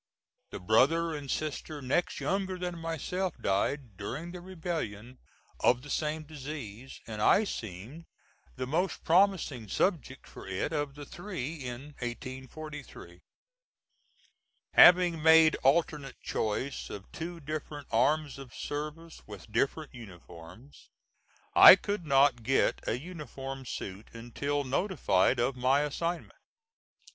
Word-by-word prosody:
The -, -, -7 dB
brother 145 Hz, -, +3 dB
and 145 Hz, -2 st, -6 dB
sister 155 Hz, +1 st, -3 dB
next 140 Hz, +6 st, -1 dB
younger 190 Hz, -1 st, -1 dB
than 180 Hz, -1 st, -4 dB
myself 165 Hz, +3 st, -3 dB
died, 110 Hz, +3 st, -1 dB
during 140 Hz, -, -5 dB
the 180 Hz, 0 st, -8 dB
rebellion, 160 Hz, -, -5 dB, 0.4 s
of 125 Hz, +1 st, +3 dB
the 145 Hz, -, -8 dB
same 155 Hz, 0 st, -1 dB
disease, 135 Hz, -5 st, -8 dB
and 110 Hz, -2 st, -6 dB
I 200 Hz, -, +5 dB
seemed 115 Hz, -, -7 dB, 0.5 s
the 130 Hz, -, -3 dB
most 165 Hz, +8 st, -1 dB
promising 170 Hz, -, +2 dB
subject 135 Hz, -, -1 dB
for -, -, -12 dB
it 95 Hz, -, -2 dB
of 145 Hz, -2 st, -2 dB
the 145 Hz, -1 st, -8 dB
three 175 Hz, -5 st, -5 dB
in 130 Hz, +2 st, -7 dB
1843. 130 Hz, -, -8 dB, 1.5 s
Having 175 Hz, -2 st, +7 dB
made 160 Hz, 0 st, +7 dB
alternate 145 Hz, -1 st, +1 dB
choice 110 Hz, +6 st, -3 dB
of 100 Hz, -1 st, -9 dB
two 170 Hz, +1 st, -6 dB
different 150 Hz, -1 st, -6 dB
arms 140 Hz, +4 st, +1 dB
of 135 Hz, -3 st, -11 dB
service 155 Hz, +3 st, -6 dB
with 105 Hz, 0 st, -11 dB
different 140 Hz, +7 st, -1 dB
uniforms, 100 Hz, -, -13 dB, 0.6 s
I -, -, +11 dB
could 200 Hz, -3 st, -4 dB
not 135 Hz, -3 st, +4 dB
get 130 Hz, +4 st, +1 dB
a 115 Hz, -, 0 dB
uniform 135 Hz, -4 st, -7 dB
suit 100 Hz, -1 st, -6 dB
until 140 Hz, +5 st, -3 dB
notified 135 Hz, -, +1 dB
of 125 Hz, +2 st, +1 dB
my 130 Hz, +3 st, +3 dB
assignment. 165 Hz, +4 st, -3 dB
145 Hz, 120 wpm, -30 LUFS, 125-165 Hz, 1.5 s, I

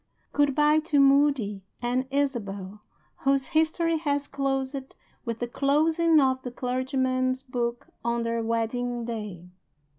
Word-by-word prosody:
Good 290 Hz, -2 st, +2 dB
by 300 Hz, +1 st, +4 dB
to 310 Hz, -2 st, +1 dB
Moody 275 Hz, -7 st, +3 dB, 0.2 s
and 250 Hz, +2 st, -1 dB
Isabel 210 Hz, -8 st, -2 dB, 0.4 s
whose 275 Hz, -1 st, +1 dB
history 320 Hz, +1 st, +2 dB
has 285 Hz, -2 st, -1 dB
closed 270 Hz, -1 st, -3 dB, 0.3 s
with 230 Hz, -2 st, -3 dB
the 240 Hz, -, -3 dB
closing 315 Hz, +5 st, +3 dB
of 260 Hz, -2 st, +2 dB
the 255 Hz, -, -5 dB
clergyman's 255 Hz, +1 st, -1 dB
book 240 Hz, -2 st, -3 dB, 0.2 s
on 235 Hz, 0 st, 0 dB
their 230 Hz, 0 st, -1 dB
wedding 230 Hz, +1 st, -1 dB
day. 210 Hz, -7 st, -6 dB
260 Hz, 125 wpm, -26 LUFS, 235-285 Hz, 0.4 s, by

